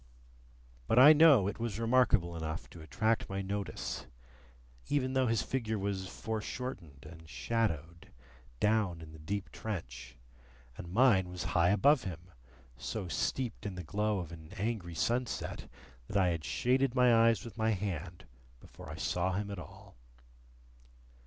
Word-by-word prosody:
But 115 Hz, -, +2 dB
I 145 Hz, +5 st, +10 dB
know 145 Hz, -, +6 dB
it 100 Hz, -, -4 dB
was 115 Hz, -3 st, -3 dB
remarkable 115 Hz, -8 st, +3 dB
enough 80 Hz, -1 st, -4 dB
to 85 Hz, -, -11 dB
attract 110 Hz, +7 st, 0 dB
my 95 Hz, 0 st, -3 dB
notice, 100 Hz, -8 st, -4 dB, 0.8 s
even 130 Hz, -3 st, 0 dB
though 130 Hz, -1 st, +2 dB
his 115 Hz, -1 st, +1 dB
figure 115 Hz, -4 st, -2 dB
was 95 Hz, -1 st, -2 dB
foreshortened 110 Hz, -, -6 dB
and 80 Hz, -1 st, -13 dB
shadowed, 85 Hz, -9 st, -2 dB, 0.5 s
down 105 Hz, -6 st, +1 dB
in 80 Hz, -1 st, -10 dB
the 80 Hz, -, -12 dB
deep 100 Hz, +6 st, -4 dB
trench, 65 Hz, -, -6 dB, 0.6 s
and 85 Hz, -, -8 dB
mine 100 Hz, -5 st, +4 dB
was 90 Hz, 0 st, -5 dB
high 85 Hz, 0 st, +4 dB
above 135 Hz, +7 st, +4 dB
him, 90 Hz, 0 st, -7 dB, 0.5 s
so 100 Hz, -, -4 dB
steeped 125 Hz, +5 st, -2 dB
in 100 Hz, -3 st, -4 dB
the 90 Hz, -, -6 dB
glow 105 Hz, +6 st, 0 dB
of 85 Hz, -3 st, -5 dB
an 80 Hz, -2 st, -11 dB
angry 100 Hz, -5 st, -3 dB
sunset, 120 Hz, +8 st, -2 dB, 0.4 s
that 100 Hz, -, -1 dB
I 95 Hz, -2 st, +4 dB
had 85 Hz, -2 st, -2 dB
shaded 125 Hz, -, +1 dB
my 125 Hz, -2 st, +5 dB
eyes 115 Hz, 0 st, +1 dB
with 115 Hz, -, -9 dB
my 110 Hz, -1 st, +1 dB
hand 90 Hz, -4 st, -3 dB, 0.3 s
before -, -, -13 dB
I -, -, -6 dB
saw 90 Hz, +1 st, -1 dB
him 100 Hz, +2 st, -3 dB
at 100 Hz, -, -5 dB
all. 85 Hz, -, -12 dB
100 Hz, 150 wpm, -32 LUFS, 85-115 Hz, 0.8 s, I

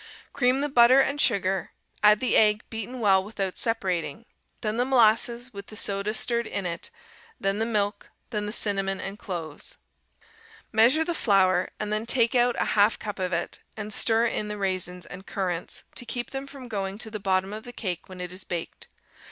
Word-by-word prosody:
Cream 255 Hz, 0 st, +2 dB
the 290 Hz, -, +1 dB
butter 255 Hz, -1 st, +6 dB
and 280 Hz, +2 st, +2 dB
sugar, 190 Hz, -4 st, +1 dB, 0.3 s
add 210 Hz, 0 st, +6 dB
the 255 Hz, -, +2 dB
egg 210 Hz, -1 st, +4 dB
beaten 225 Hz, +3 st, -5 dB
well 190 Hz, -3 st, +4 dB
without 195 Hz, -2 st, -4 dB
separating, 185 Hz, -5 st, -1 dB, 0.4 s
then 215 Hz, 0 st, -1 dB
the 245 Hz, -, +3 dB
molasses 240 Hz, -1 st, +3 dB
with 200 Hz, 0 st, -8 dB
the 215 Hz, -, -10 dB
soda 200 Hz, +1 st, 0 dB
stirred 235 Hz, 0 st, 0 dB
in 195 Hz, -, -3 dB
it, 170 Hz, -1 st, -2 dB, 0.5 s
then 195 Hz, +1 st, 0 dB
the 225 Hz, -, +1 dB
milk, 205 Hz, -2 st, -1 dB, 0.2 s
then 210 Hz, -2 st, -2 dB
the -, -, -3 dB
cinnamon 195 Hz, -3 st, 0 dB
and 195 Hz, +2 st, -6 dB
cloves. 165 Hz, -5 st, -6 dB, 1.0 s
Measure 245 Hz, +8 st, +5 dB
the 345 Hz, -, -1 dB
flour, 185 Hz, -, +3 dB
and 210 Hz, 0 st, -2 dB
then 215 Hz, +2 st, -1 dB
take 235 Hz, -2 st, +3 dB
out 245 Hz, -1 st, +3 dB
a -, -, +2 dB
half 205 Hz, +1 st, +4 dB
cup 210 Hz, -2 st, -6 dB
of 185 Hz, -1 st, -1 dB
it, 170 Hz, -, -2 dB, 0.2 s
and 210 Hz, -1 st, -5 dB
stir 225 Hz, +2 st, +3 dB
in 215 Hz, -2 st, -1 dB
the 210 Hz, 0 st, -4 dB
raisins 185 Hz, -2 st, -2 dB
and 185 Hz, +2 st, -10 dB
currants, 180 Hz, -3 st, -3 dB
to -, -, -3 dB
keep 240 Hz, 0 st, -4 dB
them 270 Hz, 0 st, -5 dB
from 275 Hz, -3 st, -10 dB
going 195 Hz, -3 st, -3 dB
to 220 Hz, 0 st, -6 dB
the 215 Hz, -, -4 dB
bottom 190 Hz, 0 st, 0 dB
of 215 Hz, -, -5 dB
the 245 Hz, -, -9 dB
cake 185 Hz, -8 st, -4 dB
when 185 Hz, -1 st, -10 dB
it 180 Hz, -1 st, -5 dB
is 185 Hz, +1 st, -7 dB
baked. 170 Hz, -2 st, -5 dB
210 Hz, 195 wpm, -26 LUFS, 190-235 Hz, 1.0 s, butter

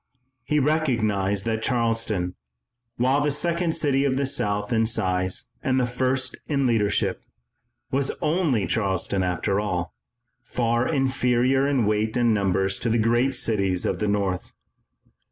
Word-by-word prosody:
He 150 Hz, +5 st, 0 dB
recognized 110 Hz, -10 st, 0 dB
that 110 Hz, -1 st, -1 dB
Charleston, 115 Hz, -7 st, 0 dB, 0.6 s
while 130 Hz, +4 st, +2 dB
the 150 Hz, -, +1 dB
second 170 Hz, +3 st, 0 dB
city 140 Hz, -4 st, +1 dB
of 135 Hz, -2 st, +1 dB
the 140 Hz, -, +1 dB
South 105 Hz, -3 st, 0 dB
in 110 Hz, -1 st, +2 dB
size 95 Hz, -4 st, 0 dB
and 130 Hz, 0 st, +1 dB
the 125 Hz, -, +2 dB
first 130 Hz, +1 st, -1 dB
in 140 Hz, -3 st, 0 dB
leadership, 110 Hz, -4 st, +1 dB, 0.7 s
was 135 Hz, +1 st, 0 dB
only 155 Hz, -, +1 dB
Charleston, 95 Hz, -2 st, 0 dB
after 90 Hz, +2 st, 0 dB
all, 90 Hz, -6 st, -3 dB, 0.5 s
far 120 Hz, 0 st, 0 dB
inferior 130 Hz, -1 st, +2 dB
in 135 Hz, -6 st, +1 dB
weight 110 Hz, +2 st, 0 dB
and 120 Hz, -2 st, +3 dB
numbers 95 Hz, -1 st, 0 dB
to 120 Hz, -, -1 dB
the 115 Hz, -, +2 dB
great 120 Hz, +4 st, +2 dB
cities 100 Hz, -7 st, 0 dB
of -, -, -1 dB
the 105 Hz, -, 0 dB
North. 100 Hz, -3 st, -1 dB
115 Hz, 140 wpm, -24 LUFS, 100-135 Hz, 0.7 s, and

